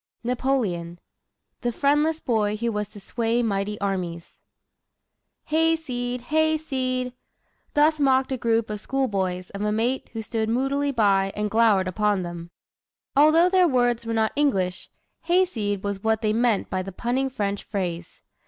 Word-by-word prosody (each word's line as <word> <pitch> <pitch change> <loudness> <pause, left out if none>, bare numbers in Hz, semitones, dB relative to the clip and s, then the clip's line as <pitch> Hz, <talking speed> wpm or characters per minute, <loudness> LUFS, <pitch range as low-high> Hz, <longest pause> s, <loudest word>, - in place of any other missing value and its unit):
NAPOLEON 235 -9 -1 0.6
THE 240 - 0
FRIENDLESS 295 +5 +1
BOY 215 -3 +1
WHO 235 +1 -1
WAS 210 -1 -2
TO 205 - -13
SWAY 230 +3 -1
MIGHTY 205 -1 -1
ARMIES 180 -4 -3 1.1
"Hayseed! 300 -7 0
hayseed!" 265 -4 0 0.6
Thus 305 +1 +4
mocked 265 -1 +3
a 260 - 0
group 230 -2 0
of 210 - -4
schoolboys 195 -8 -2
of 200 - -6
a 210 0 0
mate 235 +5 -1
who 225 -1 -4
stood 220 -1 -2
moodily 275 +4 0
by 195 -5 +2
and 210 0 -2
glowered 215 -4 +4
upon 205 0 +1
them. 170 -1 -7 0.7
Although 310 +5 +6
their 370 -2 +5
words 245 -4 +1
were 230 0 -3
not 220 -1 +2
English, 195 -11 0 0.4
"Hayseed!" 245 - +1
was 200 -1 -3
what 220 0 +1
they 215 0 +2
meant 230 -2 +1
by 185 - 0
the 195 +1 -6
punning 250 +7 -1
French 205 -5 -3
phrase. 175 -4 -5
230 Hz, 145 wpm, -24 LUFS, 200-265 Hz, 1.1 s, Although